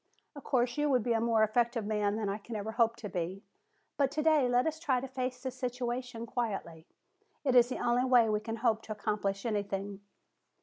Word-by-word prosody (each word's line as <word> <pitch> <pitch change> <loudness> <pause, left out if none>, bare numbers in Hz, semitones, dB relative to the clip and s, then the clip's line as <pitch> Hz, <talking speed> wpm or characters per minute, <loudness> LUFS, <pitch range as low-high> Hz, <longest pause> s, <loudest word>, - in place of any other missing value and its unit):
Of 285 - -9
course, 245 +1 0
you 295 0 +2
would 255 -5 +3
be 235 - +1
a 225 - +1
more 225 -1 +3
effective 230 +1 +1
man 210 -1 0
than 215 -1 -2
I 200 +2 -2
can 225 +2 -8
ever 210 +1 -3
hope 230 0 +2
to 235 -3 -7
be. 185 +2 -4 0.5
But 275 -2 +3
today 305 -3 +3
let 245 0 +3
us 315 0 -2
try 275 -6 +1
to 270 - -5
face 255 0 -4
the 260 - -2
situation 245 -2 -4
quietly. 195 -9 -4 0.6
It 265 -3 +2
is 245 -1 +6
the 255 - -3
only 240 +1 +1
way 245 -3 +5
we 210 -1 +1
can 225 +1 -5
hope 225 -2 +1
to 220 - -10
accomplish 205 -1 -2
anything." 200 -2 -3
235 Hz, 210 wpm, -31 LUFS, 210-250 Hz, 0.6 s, is